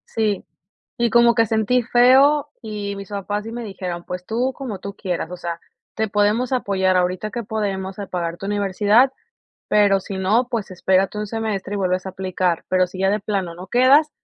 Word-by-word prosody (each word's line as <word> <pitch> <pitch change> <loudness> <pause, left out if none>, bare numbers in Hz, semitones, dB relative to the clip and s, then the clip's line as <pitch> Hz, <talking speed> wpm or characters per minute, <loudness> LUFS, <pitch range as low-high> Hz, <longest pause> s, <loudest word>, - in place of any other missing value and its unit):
Sí. 215 -3 0 0.5
Y 235 -1 +1
como 235 -1 +5
que 230 - +4
sentí 220 +3 +1
feo 270 +5 +5
y 205 -2 -4
mis 200 +1 -8
papás 205 +1 -3
sí 225 - -7
me 240 0 -5
dijeron: 185 -4 -5
"Pues 180 0 -6
tú 245 +5 -1
como 235 -9 -6
tú 200 0 -7
quieras, 180 -3 -3
o 180 - -7
sea, 170 -1 -5 0.3
te 220 -1 -1
podemos 210 +5 +1
apoyar 190 -6 +1
ahorita 180 +4 0
que 235 +2 -4
podemos 195 -3 -3
a 200 - -5
pagar 170 -1 -3
tu 195 - -6
universidad, 205 +5 +3 0.5
pero 200 -2 +4
si 190 0 -6
no, 215 +6 +2
pues 230 -5 -3
espérate 190 +2 +1
un 210 - -2
semestre 210 -3 -3
y - - -1
vuelves 185 -1 0
a 190 - -3
aplicar, 185 -2 -1
pero 185 0 +3
si 185 +1 -10
ya 195 0 +2
de 210 - +1
plano 195 -4 -3
no 180 +2 -9
quedas, 270 +7 +5
205 Hz, 200 wpm, -21 LUFS, 185-225 Hz, 0.5 s, como